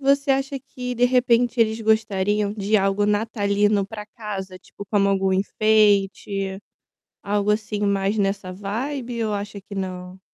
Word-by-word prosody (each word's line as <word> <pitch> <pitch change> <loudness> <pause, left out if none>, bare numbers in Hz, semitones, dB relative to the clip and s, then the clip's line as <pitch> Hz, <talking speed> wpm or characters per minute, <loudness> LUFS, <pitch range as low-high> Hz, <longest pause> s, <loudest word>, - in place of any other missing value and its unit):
Você 275 +1 +2
acha 270 +1 0
que 250 -1 -6
de 245 +1 +2
repente 245 -1 +3
eles 220 0 +2
gostariam 210 -2 +1
de 210 0 +1
algo 195 +1 +1
natalino 205 -1 +1
para 210 0 -7
casa, 195 -4 -7
tipo 200 - -11
como 200 0 +2
algum 195 -1 +1
enfeite, 200 -1 +2 0.7
algo 205 0 +1
assim 210 -1 -2
mais 200 +1 +1
nessa 195 -2 -1
ou 230 +2 -3
acha 205 0 -5
que 200 - -12
não? 185 -1 -5
205 Hz, 140 wpm, -23 LUFS, 195-225 Hz, 0.7 s, repente